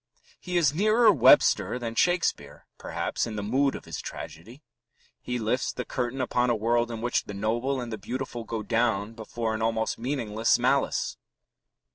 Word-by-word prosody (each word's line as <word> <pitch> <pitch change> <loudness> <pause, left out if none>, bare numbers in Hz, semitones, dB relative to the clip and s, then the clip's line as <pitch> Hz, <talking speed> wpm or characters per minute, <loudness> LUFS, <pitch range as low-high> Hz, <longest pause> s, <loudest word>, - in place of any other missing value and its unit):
He 180 -1 -2
is 150 -5 +3
nearer 215 +6 +5
Webster 130 - +5
than 115 -2 -4
Shakespeare, 175 +8 0
perhaps, - - -2
in 110 - -5
the 105 - -3
mood 135 +6 +1
of - - -9
his - - -6
tragedy; 115 - -9 0.6
he 125 - -3
lifts 120 +2 -1
the - - -5
curtain 125 +1 -3
upon 125 0 +1
a 120 - +3
world 120 +2 +1
in 115 -1 -5
which 120 +1 0
the 105 - -7
noble 120 +6 -1
and 120 -2 -5
the 110 - -5
beautiful 125 +1 -5
go 110 -1 -4
down 110 -1 0
before 115 0 -4
an 110 - -3
almost 110 0 -1
meaningless 115 -4 +1
malice. - - 0
120 Hz, 170 wpm, -27 LUFS, 110-130 Hz, 0.6 s, nearer